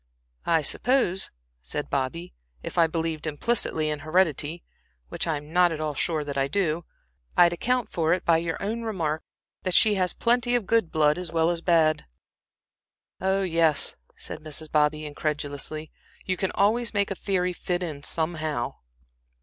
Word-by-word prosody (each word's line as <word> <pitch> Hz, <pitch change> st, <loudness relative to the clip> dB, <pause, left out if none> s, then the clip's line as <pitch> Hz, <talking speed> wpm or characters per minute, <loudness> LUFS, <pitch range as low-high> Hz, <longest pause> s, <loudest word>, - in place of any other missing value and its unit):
"I 165 Hz, -2 st, +3 dB
suppose," 215 Hz, -, +1 dB, 0.3 s
said -, -, -4 dB
Bobby, 140 Hz, +6 st, -2 dB, 0.3 s
"if -, -, -6 dB
I 170 Hz, -2 st, +5 dB
believed 160 Hz, -1 st, -2 dB
implicitly 155 Hz, -1 st, 0 dB
in 150 Hz, -, -3 dB
heredity 155 Hz, 0 st, +1 dB, 0.5 s
(which -, -, -2 dB
I 160 Hz, -2 st, +1 dB
am 150 Hz, +2 st, -11 dB
not 180 Hz, -1 st, +5 dB
at 160 Hz, -, -4 dB
all 155 Hz, -1 st, -2 dB
sure 155 Hz, +2 st, 0 dB
that 140 Hz, -1 st, -3 dB
I 135 Hz, -, +2 dB
do) 170 Hz, 0 st, 0 dB, 0.5 s
I'd 175 Hz, -1 st, +6 dB
account 250 Hz, +6 st, 0 dB
for 165 Hz, -1 st, 0 dB
it 180 Hz, -, +1 dB
by 165 Hz, -1 st, +5 dB
your 165 Hz, 0 st, -2 dB
own 220 Hz, +4 st, -2 dB
remark 165 Hz, -9 st, -2 dB, 0.4 s
that 185 Hz, -2 st, 0 dB
she 215 Hz, -, +6 dB
has 180 Hz, -, +1 dB
plenty 245 Hz, +1 st, +2 dB
of 240 Hz, -4 st, +1 dB
good 225 Hz, -5 st, +2 dB
blood 150 Hz, +1 st, +3 dB
as 180 Hz, -3 st, -5 dB
well 165 Hz, 0 st, +2 dB
as 170 Hz, -1 st, -3 dB
bad." 160 Hz, -, +3 dB, 1.1 s
"Oh, 190 Hz, +1 st, +1 dB
yes," 165 Hz, -4 st, +2 dB, 0.2 s
said -, -, -6 dB
Mrs. 155 Hz, 0 st, -5 dB
Bobby, 150 Hz, 0 st, +2 dB
incredulously, 150 Hz, 0 st, -3 dB, 0.3 s
"you 185 Hz, -, 0 dB
can 190 Hz, +1 st, -1 dB
always 220 Hz, +3 st, +2 dB
make 200 Hz, 0 st, +1 dB
a -, -, -1 dB
theory 180 Hz, -2 st, 0 dB
fit 180 Hz, +1 st, -2 dB
in 155 Hz, -5 st, -5 dB
somehow." 155 Hz, -5 st, -2 dB
165 Hz, 165 wpm, -26 LUFS, 155-185 Hz, 1.1 s, I'd